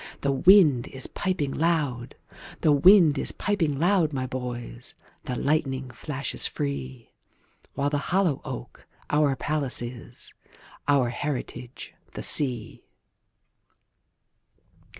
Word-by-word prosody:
The 140 - +1
wind 150 -4 +5
is 135 -1 -2
piping 180 -8 -2
loud; 150 -7 -1 0.5
The 155 - +4
wind 155 0 +6
is - - +2
piping 170 -9 -1
loud, 170 -1 +2
my 130 -1 -2
boys, 125 - -6 0.3
The 125 - -3
lightning 135 -3 -1
flashes 140 -3 -3
free—While 70 - -6
the 145 - +1
hollow 180 -6 +1
oak - - -8 0.2
our 150 -2 +3
palace 145 -1 -1
is, 120 0 -8 0.5
Our 140 -4 +3
heritage 125 -1 -5 0.2
the - - -6
sea. 125 -7 0
140 Hz, 105 wpm, -26 LUFS, 125-155 Hz, 0.5 s, wind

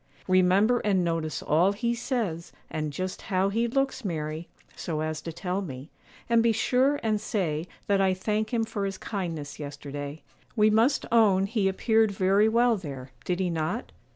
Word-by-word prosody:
'Remember 185 +6 +4
and 195 -3 +1
notice 165 -2 -2
all 175 +6 +3
he 235 +3 -1
says, 225 - -2 0.2
and 155 -1 -2
just 185 +5 -4
how 190 0 +1
he 230 +4 +1
looks, 270 +1 -1
Mary, 160 -3 -3 0.3
so 155 -3 -3
as 155 0 -3
to 165 - -6
tell 180 +3 -3
me; 140 -4 -8 0.4
and 235 -1 +4
be 230 0 +4
sure 255 +5 +2
and 215 -2 +1
say 170 -7 -1 0.2
that 200 -1 +2
"I 190 -1 +3
thank 215 +3 -1
him 235 -2 +1
for 210 -2 -3
his 195 -1 -3
kindness 165 -8 -5
yesterday;" 145 0 -6 0.3
we 215 -1 +4
must 230 +6 +3
own 205 -5 +5
he 205 -1 0
appeared 220 +3 +3
very 200 +2 +3
well 235 0 +3
there; 135 -7 -8
did 180 0 -1
he 180 -2 0
not? 165 +8 -2
195 Hz, 175 wpm, -27 LUFS, 160-220 Hz, 0.4 s, own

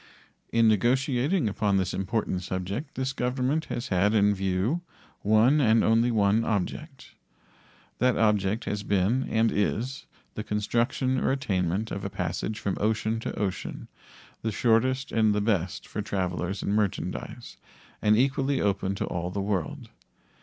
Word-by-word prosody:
In 115 -1 +4
negotiating 130 - +2
upon 100 -1 +1
this 95 -1 0
important 95 -1 -1
subject 95 - -4
this 130 +1 -2
Government 130 +4 -1
has 120 +3 -4
had 100 +3 +2
in 105 -1 +4
view 95 - 0 0.4
one, 110 +8 +4
and 115 -3 +4
only 115 +2 +3
one, 110 -1 +3
object. 100 -5 -3 0.9
That 125 0 +3
object 105 0 +1
has 105 0 -2
been, 105 +6 +1
and 110 0 +2
is, 120 +6 -1 0.3
the 110 - -4
construction 120 +5 0
or - - +1
attainment 100 -5 -1
of 100 - -4
a 100 - -3
passage 90 +4 -3
from 100 - -3
ocean 110 +1 0
to - - -5
ocean, 100 -3 -4 0.5
the 110 - -1
shortest 130 +5 +1
and 110 -2 +3
the - - +2
best 100 -5 -1
for 105 - -4
travelers 95 -1 -2
and 100 - 0
merchandise, 105 -2 -3 0.4
and 105 0 +4
equally 135 +2 +1
open 100 -1 0
to - - -2
all 90 0 -3
the 100 - -4
world. 95 -5 -2
110 Hz, 145 wpm, -27 LUFS, 100-120 Hz, 0.9 s, In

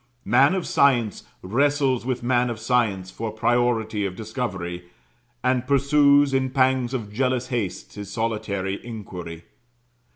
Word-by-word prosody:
Man 135 - +4
of 185 - -2
science 120 -7 +2 0.2
wrestles 135 +3 +1
with 125 -2 -2
man 125 0 +2
of 115 - -4
science 110 -6 0
for 115 +2 -4
priority 110 -1 0
of 95 -2 -3
discovery, 95 -6 -5 0.6
and 130 0 +1
pursues 140 0 +4
in 130 0 +1
pangs 130 -1 +1
of 105 -5 -5
jealous 130 +1 0
haste 115 -8 -3
his 100 -1 -8
solitary 105 -3 -2
inquiry. 90 -8 -8
120 Hz, 130 wpm, -24 LUFS, 105-130 Hz, 0.6 s, Man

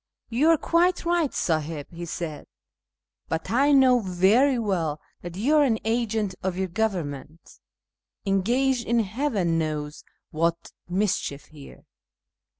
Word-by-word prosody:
" - - -66
You 260 +8 +2
are 330 - +5
quite 345 +4 +1
right, 340 -3 +2
Siiliib," 155 -2 -2
he 170 0 -7
said, 160 -2 -6 0.4
" - - -48
but 160 +3 -3
I 275 +5 +3
know 260 -3 +5
very 210 +8 +3
well 175 -9 -1 0.2
that 175 0 -8
you 280 +10 +2
are 295 - +6
an 235 -6 +2
agent 220 -3 0
of 185 -1 -2
your 190 -1 -1
govern 185 -6 -1
ment, 145 +4 -12 0.7
engaged 235 +6 +1
in 235 0 +3
heaven 205 - -1
knows 150 -1 -4 0.3
what 170 +1 -1 0.2
mischief 180 -7 -1
here." 150 -3 -14
195 Hz, 145 wpm, -25 LUFS, 165-250 Hz, 0.7 s, are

